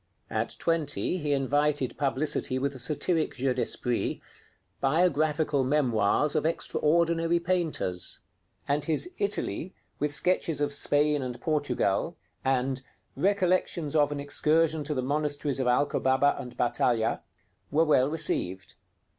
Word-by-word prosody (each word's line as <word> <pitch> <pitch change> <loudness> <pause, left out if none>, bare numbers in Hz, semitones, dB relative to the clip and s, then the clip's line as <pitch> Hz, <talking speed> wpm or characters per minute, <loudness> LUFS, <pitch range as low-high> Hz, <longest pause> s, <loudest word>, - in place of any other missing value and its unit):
At - - -2
twenty 165 +2 -1
he 150 -2 -2
invited 145 0 +1
publicity 140 -1 0
with 140 +1 -1
a 130 - -9
satiric 155 +5 0
jeu 130 0 0
d'esprit, 125 -1 -1 0.6
'Biographical 150 -1 +2
Memoirs 130 0 +2
of 155 - +2
Extraordinary 165 +1 +1
Painters'; 170 - -1 0.5
and 145 +1 +1
his 165 - 0
'Italy, 190 - -2 0.2
with 150 0 0
Sketches 165 -1 0
of 145 -1 0
Spain 145 +1 +2
and 125 -2 -5
Portugal,' 150 -2 0 0.3
and 130 0 0 0.3
'Recollections 180 -3 +1
of 145 -1 +3
an 145 - -3
Excursion 155 +2 +1
to 150 +1 -2
the 130 - -1
Monasteries 145 0 -1
of 130 - 0
Alcobaba 130 +1 +2
and 125 - -8
Baltalha,' 120 -1 +1 0.5
were 160 +3 +3
well 140 -3 +4
received. 95 - -2
145 Hz, 120 wpm, -28 LUFS, 135-160 Hz, 0.6 s, well